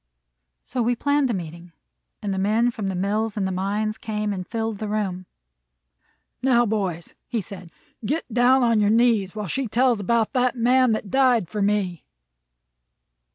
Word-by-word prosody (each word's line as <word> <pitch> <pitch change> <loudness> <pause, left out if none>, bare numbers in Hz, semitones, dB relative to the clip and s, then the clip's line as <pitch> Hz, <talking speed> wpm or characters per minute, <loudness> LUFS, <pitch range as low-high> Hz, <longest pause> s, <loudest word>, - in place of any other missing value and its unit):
So 250 - -3
we 240 +1 +1
planned 285 +1 +1
a - - 0
meeting, 170 -1 -8 0.5
and 200 -2 -1
the 190 - -2
men 220 +5 +2
from 215 -4 -4
the 190 - -2
mills 210 +4 -1
and 200 - 0
the - - -2
mines 205 +3 -2
came 210 -1 -2
and 185 -2 -6
filled 225 -3 -3
the 215 - -3
room. 195 -4 -3 1.1
"Now, 245 -2 +3
boys," 190 -6 -2 0.3
said 185 -3 -9 0.3
he, 215 - -7
"get 290 -3 -2
down 255 +2 +4
on 230 -2 +3
your 205 -1 +3
knees, 220 -4 +2
while 210 -1 -4
she 265 +8 -2
tells 240 0 +2
about 225 +2 0
that 250 -1 +1
Man 250 0 +3
that 215 -2 -4
died 255 -8 +3
for 210 +4 -4
me." 200 -4 0
215 Hz, 170 wpm, -23 LUFS, 195-240 Hz, 1.1 s, down